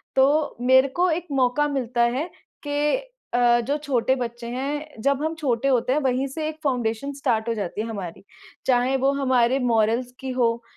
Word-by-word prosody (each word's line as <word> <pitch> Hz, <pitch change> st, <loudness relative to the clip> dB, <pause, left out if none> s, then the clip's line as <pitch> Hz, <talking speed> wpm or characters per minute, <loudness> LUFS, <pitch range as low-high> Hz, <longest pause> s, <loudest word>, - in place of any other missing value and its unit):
तो 285 Hz, +3 st, +3 dB
मेरे 260 Hz, +2 st, +5 dB
को 350 Hz, +7 st, +1 dB
एक 345 Hz, +2 st, -2 dB
मौका 270 Hz, +2 st, +2 dB
मिलता 250 Hz, -4 st, -1 dB
है 255 Hz, +8 st, 0 dB, 0.4 s
कि 290 Hz, +1 st, +1 dB, 0.4 s
अ, 240 Hz, 0 st, +4 dB
जो 280 Hz, +5 st, -1 dB
छोटे 265 Hz, -4 st, +1 dB
बच्चे 240 Hz, -2 st, -5 dB
हैं 280 Hz, +1 st, -4 dB
जब 280 Hz, 0 st, +2 dB
हम 315 Hz, +1 st, -1 dB
छोटे 265 Hz, -3 st, 0 dB
होते 255 Hz, -1 st, +2 dB
हैं, 295 Hz, -, +2 dB
वहीं 260 Hz, 0 st, 0 dB
से 305 Hz, +3 st, -4 dB
एक 310 Hz, -, -7 dB
फाउंडेशन 250 Hz, -1 st, -1 dB
स्टार्ट 235 Hz, -5 st, -1 dB
हो -, -, +1 dB
जाती 205 Hz, -1 st, -3 dB
है 225 Hz, -, -4 dB
हमारी, 195 Hz, -7 st, -6 dB, 0.4 s
चाहे 255 Hz, +1 st, +2 dB
वो 270 Hz, +1 st, +2 dB
हमारे 260 Hz, -2 st, +2 dB
मोरल्स 235 Hz, 0 st, +1 dB
की 265 Hz, -, -5 dB
हो, 235 Hz, -1 st, +1 dB
260 Hz, 185 wpm, -24 LUFS, 235-280 Hz, 0.4 s, मेरे